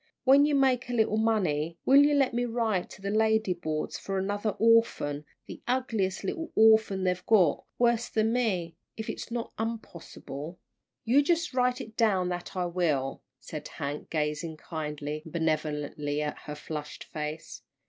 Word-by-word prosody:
When 280 +2 +6
you 295 - +2
make 260 -3 +2
a - - -2
little 220 -2 +2
money 170 -8 +1
will 275 +2 +7
you 290 0 +4
let 270 -3 +2
me 245 +1 0
write 225 -6 -1
to 190 - -13
the 200 - -1
lady 220 -2 +2
boards 155 -3 -3
for 195 0 -3
another 205 +3 -1
orphan, 220 -10 +3 0.2
the - - -10
ugliest 225 -7 0
little 325 - -4
orphan 220 -3 +5
they've 180 -1 0
got, 185 -9 +4
worse 240 -1 +2
than 220 +1 +1
me, 185 -9 0 0.2
if 220 - -3
it's - - -7
not 235 -1 -4
unpossible." 175 -8 -6 0.5
"You 255 +5 +5
just 335 +1 0
write 250 0 +2
it 220 0 -10
down 195 -6 +2
that 175 +1 -5
I 180 -1 0
will," 160 -7 -1 0.2
said - - -7
Hank, 145 +1 -5
gazing 155 +1 -2
kindly 150 -1 -5
and 160 - -11
benevolently 150 -2 -1
at 150 - -4
her 150 - -5
flushed 150 0 -6
face. 150 -4 -6
195 Hz, 165 wpm, -28 LUFS, 155-230 Hz, 0.5 s, will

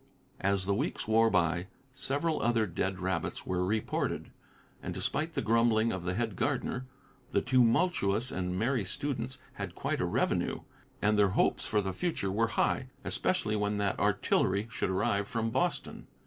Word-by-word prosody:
As 95 -1 +1
the 100 - +1
weeks 100 - -2
wore 115 +1 +5
by, 85 -2 +1 0.3
several 145 +4 -1
other 115 -1 +2
dead 95 +1 -2
rabbits 90 -2 -2
were 90 -1 0
reported, 105 +4 -1 0.5
and - - -5
despite 160 +2 -1
the - - 0
grumbling 115 0 +3
of 90 -2 -4
the 90 0 -1
head 115 -2 -1
gardener, 125 +7 -1 0.5
the - - +3
tumultuous 125 - +2
and 90 0 -2
merry 120 +2 +1
students 130 +4 -3 0.2
had - - -5
quite - - -1
a - - +2
revenue, - - 0 0.4
and 105 0 +3
their 100 -1 +5
hopes - - +2
for 105 -1 +2
the 95 -1 -3
future 160 - -1
were 115 +4 +2
high, 130 - +2 0.2
especially 115 -13 0
when 105 0 0
that 100 -1 0
artillery 100 +3 +2
should 105 - -1
arrive 100 +1 +1
from 115 +1 -1
Boston! 175 +8 -1
110 Hz, 160 wpm, -31 LUFS, 95-120 Hz, 0.5 s, wore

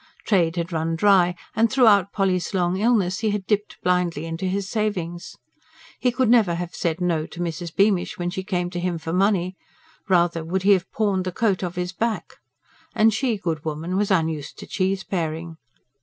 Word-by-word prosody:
Trade 175 -5 +2
had 170 0 -3
run 165 0 -1
dry, 180 -1 +4 0.2
and 225 +1 +3
throughout 210 -7 +5
Polly's 190 -2 0
long 180 -1 +1
illness 205 -5 +2
he 220 - 0
had 205 -2 -2
dipped 210 0 -1
blindly 180 -3 +1
into 165 +3 -4
his 195 +1 -1
savings. 185 -6 -3 0.6
He 250 - +2
could 255 0 +1
never 220 -7 +4
have 175 0 -5
said 170 0 -2
no 165 -3 0
to 175 - -11
Mrs. 170 -1 -4
Beamish 200 -3 +2
when 175 0 -2
she 190 +1 -4
came 180 -3 -2
to 175 - -4
him 175 -1 -1
for 165 0 -5
money 185 -1 +1 0.5
rather 170 -2 +2
would 180 +3 -2
he 200 - +5
have 190 -2 +2
pawned 200 -4 0
the 185 - -2
coat 195 -1 0
off 175 -1 -4
his 180 +1 -3
back. 225 +3 -3 0.6
And 220 0 +4
she, 235 -1 0
good 165 -5 -3
woman, 160 +3 -3
was 205 +1 +1
unused 160 -6 -1
to - - -9
cheeseparing. 170 -4 -2
180 Hz, 185 wpm, -23 LUFS, 170-200 Hz, 0.6 s, throughout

